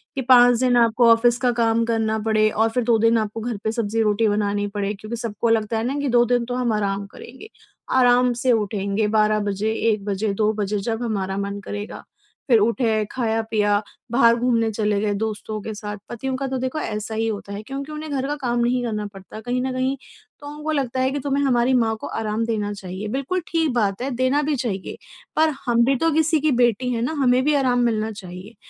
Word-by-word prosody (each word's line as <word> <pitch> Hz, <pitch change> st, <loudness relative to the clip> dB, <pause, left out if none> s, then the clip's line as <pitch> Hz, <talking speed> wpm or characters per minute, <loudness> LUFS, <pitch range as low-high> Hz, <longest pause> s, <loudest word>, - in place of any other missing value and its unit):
कि 270 Hz, -, -1 dB
5 245 Hz, -2 st, +6 dB
दिन 250 Hz, -1 st, +3 dB
आपको 235 Hz, 0 st, +4 dB
ऑफ़िस 235 Hz, +1 st, +4 dB
का 250 Hz, -2 st, +3 dB
काम 230 Hz, -1 st, +1 dB
करना 220 Hz, -1 st, 0 dB
पड़े 215 Hz, -1 st, +3 dB
और 220 Hz, +2 st, +2 dB
फ़िर 245 Hz, +2 st, 0 dB
2 235 Hz, -1 st, +4 dB
दिन 230 Hz, +1 st, +4 dB
आपको 220 Hz, 0 st, -3 dB
घर 235 Hz, -1 st, -3 dB
पे 220 Hz, -, 0 dB
सब्ज़ी-रोटी 225 Hz, -1 st, +1 dB
बनानी 205 Hz, -1 st, 0 dB
पड़े। 205 Hz, 0 st, -2 dB
क्योंकि 215 Hz, +3 st, -7 dB
सबको 230 Hz, 0 st, -2 dB
लगता 225 Hz, 0 st, +1 dB
है 220 Hz, -, -1 dB
ना 275 Hz, +3 st, -2 dB
कि 285 Hz, -1 st, -1 dB
2 240 Hz, 0 st, +4 dB
दिन 245 Hz, 0 st, +1 dB
तो 245 Hz, +1 st, -4 dB
हम 245 Hz, -3 st, 0 dB
आराम 200 Hz, -1 st, -1 dB
करेंगे। 260 Hz, -, -12 dB, 0.5 s
आराम 245 Hz, 0 st, +4 dB
से 245 Hz, +2 st, +1 dB
उठेंगे 210 Hz, -1 st, 0 dB
12 215 Hz, 0 st, +2 dB
बजे, 205 Hz, +1 st, -1 dB
1 215 Hz, -3 st, 0 dB
बजे, 205 Hz, 0 st, -1 dB
2 215 Hz, +1 st, +1 dB
बजे 210 Hz, -1 st, -2 dB
जब 225 Hz, +3 st, -3 dB
हमारा 195 Hz, -4 st, -2 dB
मन 200 Hz, 0 st, -3 dB
करेगा। 205 Hz, 0 st, -6 dB, 0.5 s
फ़िर 235 Hz, -3 st, +6 dB
उठे, 220 Hz, 0 st, +1 dB
खाया-पिया, 220 Hz, -3 st, 0 dB, 0.3 s
बाहर 235 Hz, -1 st, +5 dB
घूमने 235 Hz, -2 st, +1 dB
चले 210 Hz, -1 st, 0 dB
गए 210 Hz, -1 st, 0 dB
दोस्तों 215 Hz, 0 st, -4 dB
के 220 Hz, -, -6 dB
साथ। 210 Hz, 0 st, -6 dB
पतियों 260 Hz, +3 st, -3 dB
का 275 Hz, 0 st, -3 dB
तो 265 Hz, 0 st, -2 dB
देखो 260 Hz, +4 st, -2 dB
ऐसा 215 Hz, -3 st, -4 dB
ही 225 Hz, +1 st, 0 dB
होता 200 Hz, -2 st, -5 dB
है 200 Hz, -, -5 dB
क्योंकि 275 Hz, +5 st, -6 dB
उन्हें 305 Hz, 0 st, -6 dB
घर 270 Hz, -1 st, -1 dB
का 295 Hz, -, -2 dB
काम 240 Hz, -2 st, 0 dB
नहीं 245 Hz, +1 st, +1 dB
करना 215 Hz, -2 st, -3 dB
पड़ता 195 Hz, +2 st, -10 dB
कहीं 245 Hz, +2 st, -2 dB
न 260 Hz, -, -2 dB
कहीं, 260 Hz, +1 st, 0 dB, 0.4 s
तो 290 Hz, -, -10 dB
उनको 300 Hz, +1 st, -5 dB
लगता 265 Hz, -4 st, -1 dB
है 260 Hz, +1 st, +1 dB
कि 285 Hz, -, -2 dB
तुम्हें 280 Hz, +1 st, -1 dB
हमारी 250 Hz, -1 st, +2 dB
माँ 225 Hz, -3 st, +2 dB
को -, -, -5 dB
आराम 220 Hz, +1 st, -2 dB
देना 210 Hz, -3 st, -2 dB
चाहिए। 190 Hz, +1 st, -6 dB
बिल्कुल 275 Hz, +10 st, -2 dB
ठीक 325 Hz, -3 st, 0 dB
बात 205 Hz, -2 st, 0 dB
है 275 Hz, -, -2 dB
देना 255 Hz, +4 st, +2 dB
भी 300 Hz, 0 st, 0 dB
चाहिए, 225 Hz, -8 st, -4 dB, 0.4 s
पर 315 Hz, 0 st, +3 dB
हम 235 Hz, -1 st, +3 dB
भी 270 Hz, +2 st, +2 dB
तो 325 Hz, +5 st, +1 dB
किसी 315 Hz, +1 st, +2 dB
की 310 Hz, 0 st, +2 dB
बेटी 245 Hz, 0 st, +2 dB
हैं 230 Hz, -, -2 dB
ना, 255 Hz, -, -1 dB
हमें 250 Hz, 0 st, +3 dB
भी 300 Hz, -, +3 dB
आराम 255 Hz, -3 st, +2 dB
मिलना 220 Hz, -1 st, 0 dB
चाहिए। 190 Hz, +1 st, -10 dB
230 Hz, 220 wpm, -22 LUFS, 210-255 Hz, 0.5 s, 5